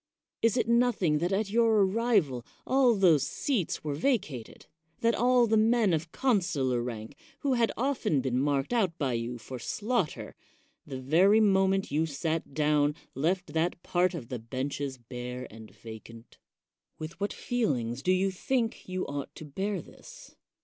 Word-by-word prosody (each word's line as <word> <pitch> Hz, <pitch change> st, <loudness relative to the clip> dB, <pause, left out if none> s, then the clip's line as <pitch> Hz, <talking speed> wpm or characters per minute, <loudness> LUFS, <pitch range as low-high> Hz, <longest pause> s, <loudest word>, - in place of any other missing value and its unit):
Is 230 Hz, +1 st, +3 dB
it 240 Hz, -, +1 dB
noth 235 Hz, -2 st, +2 dB
ing 150 Hz, -3 st, +3 dB
that 175 Hz, +3 st, -1 dB
at 200 Hz, +1 st, 0 dB
your 225 Hz, -3 st, +4 dB
arrival 190 Hz, -, +1 dB, 0.2 s
all 260 Hz, -3 st, +4 dB
those 175 Hz, -7 st, +5 dB
seats 205 Hz, -, -1 dB
were 150 Hz, -2 st, -2 dB
vacated? 155 Hz, -, -2 dB, 0.4 s
that 230 Hz, 0 st, +3 dB
all 245 Hz, +1 st, +4 dB
the 220 Hz, -1 st, +2 dB
men 220 Hz, -3 st, +3 dB
of 160 Hz, +1 st, -2 dB
consular 175 Hz, -, +1 dB
rank, 115 Hz, +1 st, -6 dB, 0.3 s
who 275 Hz, -2 st, +1 dB
had 235 Hz, -2 st, +2 dB
often 240 Hz, -, +1 dB
been 130 Hz, -1 st, 0 dB
marked 140 Hz, -, 0 dB
out 190 Hz, -8 st, +1 dB
by 135 Hz, -6 st, -1 dB
you 120 Hz, +1 st, -3 dB
for 125 Hz, +2 st, -8 dB
slaughter, 210 Hz, -, -2 dB, 0.5 s
the 130 Hz, -, -5 dB
very 175 Hz, +11 st, +4 dB
moment 195 Hz, -3 st, +3 dB
you 155 Hz, +3 st, +1 dB
sat 155 Hz, 0 st, -3 dB
down, 150 Hz, -1 st, +2 dB, 0.2 s
left 180 Hz, +7 st, -1 dB
that 170 Hz, +2 st, -1 dB
part 180 Hz, +1 st, +1 dB
of 125 Hz, -8 st, -7 dB
the 125 Hz, -3 st, -4 dB
benches 130 Hz, +3 st, -4 dB
bare 125 Hz, +1 st, -7 dB
and 110 Hz, 0 st, -11 dB
vacant? 115 Hz, +1 st, -12 dB, 0.6 s
With 155 Hz, +3 st, -8 dB
what 200 Hz, +1 st, -1 dB
feel 240 Hz, -, 0 dB
ings 120 Hz, +1 st, -4 dB
do 185 Hz, -, +1 dB
you 190 Hz, +1 st, +2 dB
think 230 Hz, +2 st, -2 dB
you 185 Hz, 0 st, -2 dB
ought 140 Hz, -1 st, -5 dB
to 155 Hz, -, -9 dB
bear 195 Hz, +8 st, -3 dB
this? -, -, -14 dB
170 Hz, 165 wpm, -29 LUFS, 135-220 Hz, 0.6 s, those